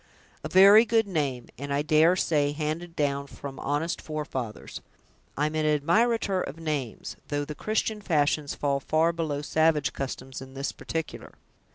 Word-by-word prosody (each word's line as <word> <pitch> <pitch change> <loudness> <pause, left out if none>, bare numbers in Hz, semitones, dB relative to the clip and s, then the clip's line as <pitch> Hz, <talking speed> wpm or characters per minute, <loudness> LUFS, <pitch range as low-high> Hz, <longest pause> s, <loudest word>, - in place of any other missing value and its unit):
"A - - -4
very 200 +4 +8
good 225 -1 +2
name, 140 -9 -2
and, 140 +1 -5
I 140 +1 +1
dare 155 +3 +4
say, 145 -5 +1
handed 160 +3 -4
down 140 -2 -1
from 140 -1 -9
honest 145 +4 -2
forefathers. 135 -8 -5 0.6
I'm 150 +2 0
an 155 0 0 0.2
admirator 200 +4 +2
of 150 - -7
names, 150 -8 -4
though 145 0 -2
the 150 - -6
Christian 215 +5 -2
fashions 150 -5 +1
fall 140 -1 0
far 160 +4 +1
below 155 -4 -3
savage 155 -1 +2
customs 135 -1 -6
in 130 0 -11
this 135 +1 -2
particular. 160 -1 -6
150 Hz, 155 wpm, -27 LUFS, 140-170 Hz, 0.6 s, very